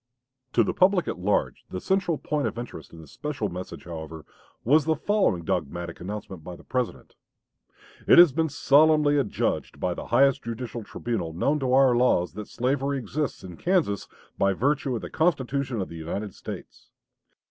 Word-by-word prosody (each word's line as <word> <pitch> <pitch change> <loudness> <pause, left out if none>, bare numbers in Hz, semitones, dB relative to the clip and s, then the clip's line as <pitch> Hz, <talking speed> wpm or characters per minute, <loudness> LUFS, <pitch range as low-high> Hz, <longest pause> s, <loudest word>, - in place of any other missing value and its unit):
To 115 - +5
the - - -1
public 185 0 +3
at - - -3
large, 100 +3 0
the 90 - -4
central 190 - 0
point 150 -1 -1
of - - -5
interest 120 -9 -8
in 80 - -11
this 75 - -15
special 135 -8 -3
message, 90 +1 -7
however, 80 -2 -8 0.4
was 145 +5 +4
the 160 0 +2
following 190 - +1
dogmatic 85 +2 -3
announcement 95 -3 -6
by 90 - -7
the - - -15
President: 125 -2 -3 0.9
"It - - +7
has 175 -3 +9
been 160 +4 0
solemnly 145 +1 +4
adjudged 120 -7 -2
by - - 0
the - - -7
highest 135 -1 +4
judicial 115 0 -5
tribunal 105 -7 -4
known 140 - +1
to 130 -2 -1
our 130 -2 +5
laws 120 -8 +2
that 105 -1 -7
slavery 135 +3 -1
exists 135 +5 -3
in 90 -2 -9
Kansas 170 - 0 0.3
by 100 0 +3
virtue 135 +4 0
of 115 - -5
the - - -5
Constitution 140 -6 0
of 95 - -4
the 85 - -8
United 95 +5 -4
States. - - -9
125 Hz, 175 wpm, -26 LUFS, 95-145 Hz, 0.9 s, has